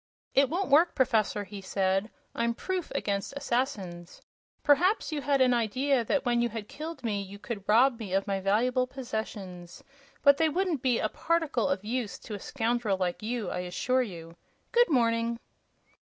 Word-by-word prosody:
"It 275 -1 +4
won't 365 +3 -1
work, 330 +4 +5
Professor," 220 -5 +2
he 200 0 -9
said. 195 +2 0 0.2
"I'm 235 0 0
proof 370 +2 -3
against 200 +6 -2
assassins. 215 -11 -3 0.4
Perhaps 350 +8 +3
you 300 -2 -2
had 275 0 +2
an 255 -1 +5
idea 250 +3 +1
that 280 +5 0
when 240 -1 +2
you 240 - +1
had 220 -2 -6
killed 315 +1 -7
me 210 -3 -1
you 200 +1 -9
could 205 -2 -7
rob 240 +3 +5
me 210 -5 -6
of 195 0 +2
my 195 -2 -1
valuable 245 +6 +2
possessions; 205 -8 -6 0.4
but 280 0 +7
they 320 +1 +3
wouldn't 350 -3 0
be 250 -3 +2
a - - +1
particle 320 -3 0
of 190 +2 -1
use 235 -1 -2
to 220 - -9
a 205 - -4
scoundrel 230 -3 -1
like 180 -2 -2
you, 220 -3 -3
I - - -3
assure 180 +9 0
you! 170 -7 -7 0.4
Good 480 -2 +4
morning." 230 -3 +2
235 Hz, 175 wpm, -29 LUFS, 200-275 Hz, 0.4 s, but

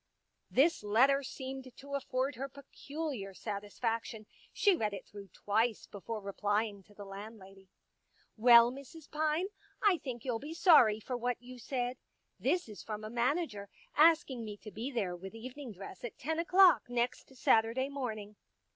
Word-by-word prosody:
This 315 +6 +3
letter 260 +7 +4
seemed 260 -1 -7
to 280 +1 -10
afford 270 0 -1
her 270 +3 -5
peculiar 280 -6 -6
satis 205 -1 -6
faction; 225 -2 -2 0.3
she 405 -3 +4
read 210 -8 -1
it - - -9
through 200 -1 -11
twice 220 +4 0
before 215 +2 -6
replying 205 +1 -1
to 205 - -21
the 205 - -9
landlady. 195 -1 -11 0.3
" - - -38
Well, 235 +1 +7
Mrs. 280 +4 -11
Pine, 310 +4 0 0.3
I 390 -5 +3
think 245 -3 -6
you'll 240 -3 -1
be 305 +5 -7
sorry 270 - +6
for 250 +4 -4
what 245 0 -1
you 250 +1 -11
said. 250 0 -2 0.4
This 355 -6 +1
is 210 -2 -9
from 215 -1 -6
a 215 - -6
manager, 240 - -1 0.3
asking 305 -6 +4
me 210 -2 -6
to 215 - -8
be 230 +6 -4
there 205 -9 -2
with 190 +4 -9
evening 255 +3 -8
dress 195 -1 -10
at 240 - -6
ten 320 +4 -2
o'clock 360 -3 +5
next 245 +2 -2
Saturday 230 +2 +3
morning." 220 -7 -5
240 Hz, 165 wpm, -33 LUFS, 210-275 Hz, 0.4 s, Well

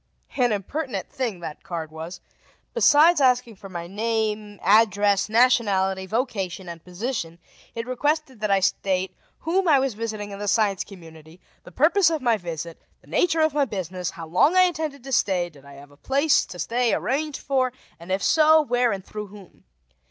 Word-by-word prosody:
An 245 -3 +2
impertinent 255 - -4
thing, 240 -10 -3
that 155 -3 -7
card 165 -3 -6
was. 160 +3 -8 0.5
Besides 310 +2 +5
asking 250 -4 +2
for 195 0 -11
my 170 -2 -6
name, 215 +1 -2
address, 205 -1 +3
nationality, 200 -5 +2
vocation, 195 -5 -3
and 170 -1 -9
position, 180 -2 -4 0.4
it 230 0 -4
requested 280 +1 -1
that 210 0 -2
I 195 -1 +3
state 190 -1 0 0.3
whom 360 +3 0
I 300 -4 +6
was 265 -2 0
visiting 215 -1 -5
in 200 - -8
the 205 - -4
Science 205 -2 +1
Community, 165 -3 -14 0.3
the - - -12
purpose 320 - +4
of 320 -2 -1
my 240 -4 +2
visit, 170 -4 -7 0.2
the - - -24
nature 330 -2 +1
of 315 -2 +2
my 290 -1 +2
business, 185 -5 -4
how 165 - -8
long 185 - +3
I 370 - +8
intended 315 -7 -2
to 270 - -8
stay, 180 -7 +1
did 140 -3 -18
I 140 - -13
have 140 +1 -14
a 145 - -20
place 280 - +2
to 180 - -10
stay 235 +5 0
arranged 295 +3 -2
for, 260 -2 0 0.3
and 170 +2 -9
if 190 +1 0
so, 315 0 +5
where 245 -5 +1
and 195 -1 -5
through 210 -1 -7
whom. 200 -2 -16
215 Hz, 180 wpm, -24 LUFS, 185-265 Hz, 0.5 s, I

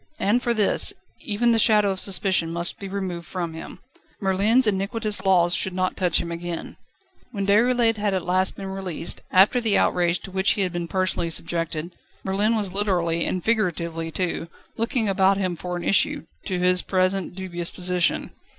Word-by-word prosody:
And 225 +5 +2
for 240 - 0
this, 220 - +3 0.3
even 235 +3 +1
the 225 - +3
shadow 210 -2 +5
of 190 - -4
suspicion 190 -4 +1
must 170 0 -3
be 195 - -6
removed 185 -4 -4
from 170 -3 -4
him. 165 +3 -9 0.4
Merlin's 205 +6 +3
iniquitous 210 +1 -1
law 185 -3 +4
should 180 +1 -1
not 185 0 -1
touch 180 -3 +1
him 170 0 -4
again. 170 0 -6 0.5
When 200 -4 -3
Déroulède 225 +2 +3
at 195 -4 -1
last 185 +1 +1
had 200 - -7
been 190 0 -5
released, 185 -4 -3
after 200 +7 +4
the 220 -3 +2
outrage 175 -1 +1
to 195 - -10
which 190 +1 +2
he 205 - -2
had 185 -2 0
been 175 -1 -3
personally 185 -2 -1
subjected, 165 0 -3 0.3
Merlin 205 +4 +1
was 200 -4 -2
literally, 175 -5 0
and 185 -2 -2
figuratively 170 -7 -1
too, 170 0 -3 0.3
looking 230 0 0
about 195 0 +3
him 185 -3 -1
for 180 +1 -5
an 175 - -6
issue 195 - +1 0.2
to 185 -3 -1
his 180 0 +2
present 185 -1 0
dubious 175 -2 -4
position. 180 -1 0
190 Hz, 180 wpm, -23 LUFS, 175-205 Hz, 0.5 s, shadow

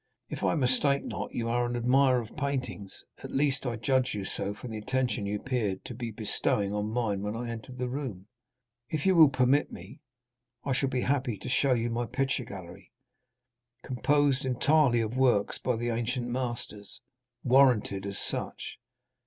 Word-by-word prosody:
If - - -5
I - - +2
mistake 140 0 +2
not - - -4
you 115 - -1
are 120 +1 +1
an 120 - -3
admirer 130 +2 +4
of 110 - -11
paintings, 130 -8 -4 0.2
at - - -8
least 140 -1 +1
I 120 - -1
judged 125 +1 +1
so 100 - -2
from 120 +2 -8
the 110 - -4
attention 120 -3 -1
you 105 +1 -2
appeared 110 -8 -2
to - - -6
be 120 0 -5
bestowing 105 -2 0
on 105 0 -1
mine 110 -4 -1
when 105 +2 -3
I 120 0 -4
entered 115 +3 -8
the 125 0 -2
room. 125 -8 -5 0.6
If 155 +1 -2
you 190 -1 +4
will 160 -4 +8
permit 130 +2 +2
me, - - -11 0.6
I 140 - +1
shall 135 +1 +1
be 130 -1 -1
happy 130 -5 0
to - - -7
show 135 +1 +3
you 115 0 -1
my 120 +1 -1
picture 135 +2 -1
gallery, 95 -1 -10 0.9
composed 140 +1 +2
entirely 130 -1 +3
of 110 +2 -3
works 125 -6 +2
by 125 - 0
the 120 +1 -2
ancient 120 +2 -1
masters—warranted 120 -1 0
as 100 - -4
such. - - -4
125 Hz, 170 wpm, -29 LUFS, 110-130 Hz, 0.9 s, will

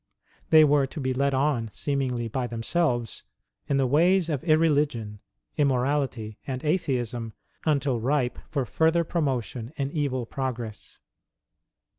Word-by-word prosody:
They 155 -1 +8
were 145 -2 +4
to 155 - -8
be 130 -2 -1
led 140 +1 +1
on, 130 -5 +1
seemingly 130 -4 -1
by 125 +2 -2
themselves, 120 +1 -1 0.5
in 140 - +2
the 135 - +3
ways 170 +6 +3
of 145 -5 -2
irreligion, 150 - +2 0.4
immorality, 130 -5 0
and 130 -1 -4
Atheism, 125 - -1 0.3
until 140 -5 +1
ripe 125 +1 0
for 140 -4 -1
further 160 +8 +2
promotion 130 -7 -2
in 140 -2 -2
evil 135 -5 -1
progress. 120 -4 -5
135 Hz, 125 wpm, -26 LUFS, 120-150 Hz, 0.5 s, They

